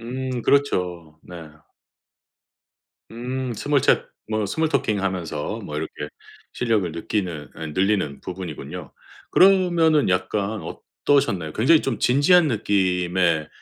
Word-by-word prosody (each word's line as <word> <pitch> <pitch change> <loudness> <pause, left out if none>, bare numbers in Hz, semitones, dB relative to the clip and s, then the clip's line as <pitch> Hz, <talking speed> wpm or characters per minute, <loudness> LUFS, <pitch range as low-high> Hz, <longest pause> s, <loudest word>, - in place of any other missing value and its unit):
음 130 +1 -4
그렇죠. 90 - 0
네. 85 -3 -10 1.6
음. 125 +2 -4
스몰 140 +5 +1
챗 - - +3 0.2
뭐 110 -1 0
스몰 160 +11 0
토킹 105 -9 0
하면서 90 -6 -3
뭐 - - -6
이렇게 - - -4 0.6
실력을 110 -7 0
느끼는 85 -3 -3
아니 80 -2 -6
늘리는 95 -6 0
부분이군요. 90 -4 -7 0.4
그러면은 175 -5 +4
약간 100 +3 -1
어떠셨나요? 95 - -1
굉장히 145 - +4
좀 130 -4 -2
진지한 150 +7 +4
느낌의 90 - +1
105 Hz, 255 characters per minute, -23 LUFS, 90-130 Hz, 1.6 s, 그러면은